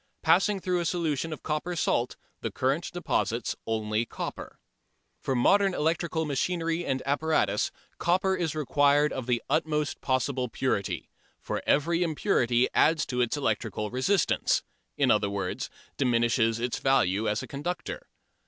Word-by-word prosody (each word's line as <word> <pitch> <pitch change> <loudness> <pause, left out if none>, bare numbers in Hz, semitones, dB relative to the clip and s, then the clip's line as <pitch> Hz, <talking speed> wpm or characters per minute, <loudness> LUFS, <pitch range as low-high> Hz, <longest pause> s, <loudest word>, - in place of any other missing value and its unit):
Passing 195 +5 +4
through 180 -1 0
a 170 - -2
solution 165 -3 -1
of 155 - -7
copper 160 +3 -2
salt, 125 -6 0 0.3
the - - -2
current 135 +7 -1
deposits 150 -8 -1
only 110 0 0
copper. - - -6 0.6
For 135 - -1
modern 195 +9 +4
electrical 160 +1 0
machinery 165 +3 -1
and 130 -4 -2
apparatus 140 -7 +1 0.3
copper 190 +2 +2
is 165 -4 -2
required 145 0 +3
of 130 -2 -5
the 120 -2 0
utmost 150 -2 0
possible 130 -1 0
purity, 110 -5 -2 0.3
for - - -3
every 165 +4 +2
impurity 135 - +2
adds 160 -1 +3
to 125 -1 -1
its 120 +4 0
electrical 110 -4 -2
resistance, 155 +11 +1 0.3
in - - +4
other 100 - +2
words, 100 -2 -3 0.3
diminishes 115 -3 +2
its 120 0 -2
value 110 -6 +2
as 105 +1 -1
a - - -7
conductor. 175 - -5
145 Hz, 140 wpm, -28 LUFS, 120-165 Hz, 0.6 s, Passing